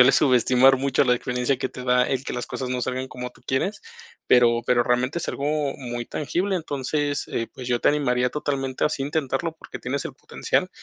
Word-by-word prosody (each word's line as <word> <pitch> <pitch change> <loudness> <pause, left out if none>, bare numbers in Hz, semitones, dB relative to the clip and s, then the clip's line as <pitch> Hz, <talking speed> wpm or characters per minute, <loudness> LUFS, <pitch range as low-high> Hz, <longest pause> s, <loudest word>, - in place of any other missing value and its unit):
suele 125 +2 +8
subestimar 130 0 +5
mucho 135 0 +2
la 125 -1 +4
experiencia 125 +2 -1
que 130 - -1
te 125 - -9
da 125 0 +4
el 135 0 -1
que - - -4
las 125 0 -3
cosas 130 - -4
no 125 0 -2
salgan 130 +1 -2
como 125 0 -6
tú - - -23
quieres. 135 +11 -1 0.5
Pero 120 -1 +5
pero 120 -1 +4
realmente 125 +6 +1
es 170 - -5
algo 140 - -3 0.3
muy 120 -2 -5
tangible, 185 +7 -1
entonces, 145 -2 -2
eh, 115 - -2
pues, 125 - -8
yo 120 -1 +1
te - - +4
animaría 125 -4 +2
totalmente 135 -3 -2
así 145 -2 0
a - - -1
intentarlo 155 +1 -1
porque - - -9
tienes 135 +2 -3
el - - -6
potencial. - - -1
130 Hz, 210 wpm, -24 LUFS, 125-140 Hz, 0.5 s, suele